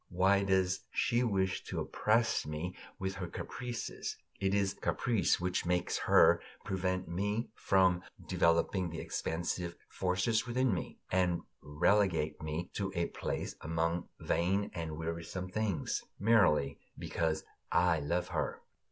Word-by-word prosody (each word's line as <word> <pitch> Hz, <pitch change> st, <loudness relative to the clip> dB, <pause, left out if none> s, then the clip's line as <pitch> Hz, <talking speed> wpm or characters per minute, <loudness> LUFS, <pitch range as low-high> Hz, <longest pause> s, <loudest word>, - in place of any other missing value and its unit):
Why 95 Hz, +2 st, +3 dB
does 95 Hz, -1 st, +2 dB
she 120 Hz, 0 st, +1 dB
wish 95 Hz, -5 st, +1 dB
to -, -, -3 dB
oppress 115 Hz, +2 st, +2 dB
me 80 Hz, +4 st, -4 dB, 0.2 s
with 95 Hz, 0 st, -2 dB
her 95 Hz, -2 st, -4 dB
caprices? 120 Hz, +6 st, -5 dB, 0.2 s
It 95 Hz, 0 st, +1 dB
is 100 Hz, -1 st, +2 dB
caprice 115 Hz, -5 st, +1 dB
which 90 Hz, 0 st, 0 dB
makes 90 Hz, 0 st, 0 dB
her -, -, +7 dB, 0.2 s
prevent 95 Hz, -1 st, -1 dB
me 105 Hz, +7 st, -1 dB
from 95 Hz, -4 st, +3 dB, 0.3 s
developing 85 Hz, +2 st, +2 dB
the 80 Hz, 0 st, -5 dB
expansive 85 Hz, +1 st, -2 dB
forces 95 Hz, +6 st, +1 dB
within 125 Hz, -1 st, +2 dB
me, 85 Hz, -, -4 dB
and 90 Hz, -2 st, +2 dB, 0.2 s
relegate 80 Hz, +1 st, +2 dB
me 80 Hz, +3 st, -3 dB
to 95 Hz, -2 st, -2 dB
a 85 Hz, 0 st, 0 dB
place -, -, -3 dB
among 80 Hz, +2 st, -1 dB
vain 95 Hz, +4 st, +1 dB
and 80 Hz, -3 st, -4 dB
wearisome 85 Hz, +3 st, -4 dB
things, 105 Hz, -2 st, -1 dB, 0.2 s
merely 90 Hz, -10 st, +4 dB, 0.2 s
because 80 Hz, -2 st, -1 dB, 0.3 s
I 85 Hz, -2 st, +4 dB
love 85 Hz, +5 st, -1 dB
her. -, -, -2 dB
90 Hz, 130 wpm, -33 LUFS, 85-100 Hz, 0.3 s, her